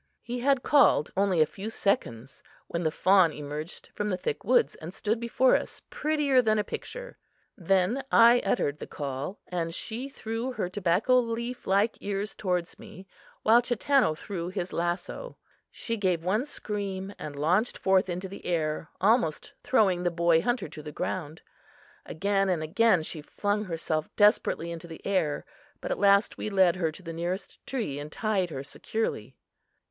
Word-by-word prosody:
He 245 Hz, +1 st, -4 dB
had 270 Hz, 0 st, +2 dB
called 280 Hz, -, +4 dB
only 190 Hz, -4 st, +2 dB
a -, -, +6 dB
few 200 Hz, +7 st, -7 dB
seconds 135 Hz, -, -2 dB, 0.3 s
when 170 Hz, -, -3 dB
the 160 Hz, -, +1 dB
fawn 185 Hz, +1 st, +4 dB
emerged 150 Hz, +2 st, -7 dB
from 210 Hz, 0 st, -2 dB
the 185 Hz, -, 0 dB
thick 450 Hz, -, -3 dB
woods 475 Hz, -2 st, +3 dB
and 160 Hz, +2 st, -8 dB
stood 220 Hz, +2 st, -1 dB
before 235 Hz, +2 st, +3 dB
us, -, -, -3 dB
prettier 300 Hz, -, +2 dB
than 215 Hz, -2 st, +2 dB
a 210 Hz, -, +2 dB
picture. -, -, -7 dB, 0.4 s
Then 195 Hz, +7 st, +1 dB
I 235 Hz, +1 st, +7 dB
uttered 145 Hz, -10 st, 0 dB
the -, -, -7 dB
call, 140 Hz, +6 st, -5 dB
and 165 Hz, -2 st, -3 dB
she 240 Hz, +7 st, -5 dB
threw 230 Hz, 0 st, -4 dB
her 180 Hz, -, -2 dB
tobacco 200 Hz, +7 st, +2 dB
leaf 235 Hz, +1 st, -4 dB
like 200 Hz, +4 st, +2 dB
ears 200 Hz, +1 st, -3 dB
toward 180 Hz, -4 st, -1 dB
me, 190 Hz, -, -12 dB, 0.4 s
while 230 Hz, +2 st, +6 dB
Chatanna 245 Hz, -, +2 dB
threw 175 Hz, -3 st, -5 dB
his 185 Hz, -1 st, -4 dB
lasso. 175 Hz, -, -3 dB, 0.3 s
She 230 Hz, -1 st, -4 dB
gave 185 Hz, -5 st, 0 dB
one 210 Hz, +8 st, +1 dB
scream 200 Hz, -7 st, -5 dB
and 150 Hz, -1 st, -6 dB
launched 180 Hz, +11 st, +1 dB
forth 190 Hz, -1 st, +2 dB
into 180 Hz, +2 st, -3 dB
the 195 Hz, -, -10 dB
air, 155 Hz, -3 st, -1 dB
almost 200 Hz, -6 st, +1 dB
throwing 195 Hz, -8 st, +3 dB
the 175 Hz, -, +1 dB
boy 170 Hz, -1 st, +3 dB
hunter 245 Hz, +4 st, -1 dB
to 150 Hz, -, -10 dB
the 150 Hz, 0 st, -8 dB
ground. 160 Hz, 0 st, -4 dB, 0.6 s
Again 195 Hz, +2 st, 0 dB
and 170 Hz, -4 st, 0 dB
again 190 Hz, +2 st, +3 dB
she 155 Hz, 0 st, -6 dB
flung 205 Hz, +7 st, -2 dB
herself 160 Hz, -3 st, -2 dB
desperately 205 Hz, -5 st, +3 dB
into 170 Hz, 0 st, -7 dB
the 165 Hz, -1 st, -11 dB
air, 180 Hz, -7 st, 0 dB, 0.3 s
but -, -, -5 dB
at -, -, -1 dB
last 200 Hz, +1 st, +4 dB
we -, -, -2 dB
led 190 Hz, -4 st, +4 dB
her 165 Hz, -3 st, 0 dB
to 185 Hz, -, -14 dB
the 165 Hz, -1 st, -6 dB
nearest 175 Hz, +4 st, -4 dB
tree 215 Hz, -, -3 dB
and 150 Hz, +1 st, -7 dB
tied 200 Hz, -3 st, 0 dB
her 135 Hz, -4 st, -5 dB
securely. 220 Hz, +9 st, -4 dB
190 Hz, 170 wpm, -28 LUFS, 165-225 Hz, 0.6 s, I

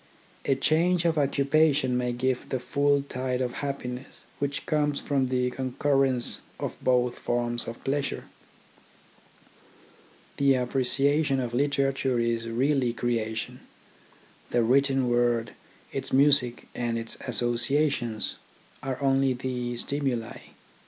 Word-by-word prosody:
A 135 Hz, -, +3 dB
change 170 Hz, +5 st, +2 dB
of 160 Hz, -2 st, +2 dB
occupation 140 Hz, -1 st, +2 dB
may 125 Hz, 0 st, 0 dB
give 125 Hz, +1 st, -1 dB
the 130 Hz, -, -1 dB
full 140 Hz, +2 st, +1 dB
tide 130 Hz, -2 st, -3 dB
of 125 Hz, -1 st, -1 dB
happiness 135 Hz, -2 st, -5 dB, 0.2 s
which 140 Hz, 0 st, -2 dB
comes 150 Hz, -2 st, +1 dB
from 135 Hz, -3 st, 0 dB
the 125 Hz, 0 st, 0 dB
concurrence 130 Hz, -1 st, +1 dB, 0.2 s
of -, -, -4 dB
both 125 Hz, -1 st, +2 dB
forms 120 Hz, 0 st, 0 dB
of 115 Hz, 0 st, -7 dB
pleasure. 140 Hz, +1 st, -2 dB, 2.1 s
The 140 Hz, -1 st, +4 dB
appreciation 135 Hz, +3 st, +2 dB
of 120 Hz, -2 st, -3 dB
literature 135 Hz, -1 st, +1 dB
is 115 Hz, 0 st, -1 dB
really 130 Hz, +1 st, +1 dB
creation. 115 Hz, -2 st, -2 dB, 0.9 s
The 120 Hz, -1 st, +2 dB
written 135 Hz, +2 st, +3 dB
word, 120 Hz, -1 st, +1 dB, 0.4 s
its -, -, -3 dB
music, 135 Hz, -3 st, +3 dB
and 120 Hz, -1 st, -2 dB
its 115 Hz, 0 st, -4 dB
associations, 120 Hz, 0 st, 0 dB, 0.4 s
are 130 Hz, -1 st, -4 dB
only 135 Hz, -1 st, +3 dB
the 125 Hz, -1 st, -3 dB
stimuli. 125 Hz, -4 st, -2 dB
130 Hz, 115 wpm, -27 LUFS, 120-140 Hz, 2.1 s, The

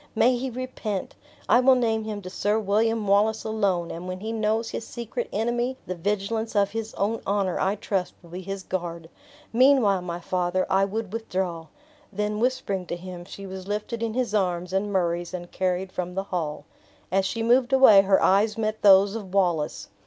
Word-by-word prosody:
May 245 Hz, +3 st, +4 dB
he 260 Hz, +2 st, -3 dB
repent! 240 Hz, -5 st, -4 dB, 0.3 s
I -, -, +5 dB
will 260 Hz, +1 st, +6 dB
name 225 Hz, -3 st, 0 dB
him 210 Hz, -2 st, -5 dB
to 185 Hz, -, -6 dB
Sir 205 Hz, +2 st, 0 dB
William 220 Hz, +1 st, +1 dB
Wallace 210 Hz, +2 st, +2 dB
alone; 200 Hz, -6 st, 0 dB
and 175 Hz, +2 st, -7 dB
when 185 Hz, 0 st, -5 dB
he 220 Hz, +3 st, -4 dB
knows 220 Hz, +1 st, 0 dB
his -, -, -4 dB
secret 235 Hz, 0 st, -5 dB
enemy, 240 Hz, +4 st, -1 dB
the 185 Hz, -, -3 dB
vigilance 205 Hz, +5 st, -2 dB
of 200 Hz, -1 st, +3 dB
his 225 Hz, 0 st, -5 dB
own 215 Hz, +3 st, -1 dB
honor, 195 Hz, -3 st, 0 dB
I 195 Hz, +2 st, +1 dB
trust, 195 Hz, -3 st, -2 dB
will 170 Hz, -, -15 dB
be 180 Hz, +2 st, -6 dB
his 195 Hz, +1 st, -6 dB
guard. 170 Hz, -3 st, -5 dB, 0.4 s
Meanwhile, 240 Hz, -6 st, +4 dB
my 175 Hz, -1 st, -5 dB
father, 180 Hz, +1 st, 0 dB
I 195 Hz, +1 st, +4 dB
would 210 Hz, 0 st, -4 dB
withdraw." 185 Hz, -7 st, -3 dB, 0.4 s
Then 210 Hz, +1 st, -2 dB
whispering 210 Hz, -7 st, -1 dB
to -, -, -3 dB
him, 175 Hz, 0 st, -8 dB
she 195 Hz, +1 st, -9 dB
was 190 Hz, 0 st, -8 dB
lifted 210 Hz, +3 st, -3 dB
in 230 Hz, -1 st, -2 dB
his 250 Hz, -4 st, -1 dB
arms 180 Hz, -3 st, 0 dB
and 200 Hz, +2 st, 0 dB
Murray's 175 Hz, -1 st, -1 dB
and 175 Hz, -1 st, -8 dB
carried 185 Hz, 0 st, -1 dB
from 180 Hz, -1 st, -4 dB
the 195 Hz, -, -1 dB
hall. 155 Hz, -4 st, -3 dB, 0.5 s
As 195 Hz, +1 st, +3 dB
she 225 Hz, +4 st, -2 dB
moved 245 Hz, +2 st, +3 dB
away 260 Hz, -7 st, +8 dB
her 195 Hz, 0 st, +3 dB
eyes 205 Hz, +3 st, +3 dB
met 215 Hz, -1 st, -2 dB
those 195 Hz, 0 st, +6 dB
of 200 Hz, -4 st, -6 dB
Wallace. 175 Hz, -6 st, 0 dB
200 Hz, 190 wpm, -25 LUFS, 185-225 Hz, 0.5 s, away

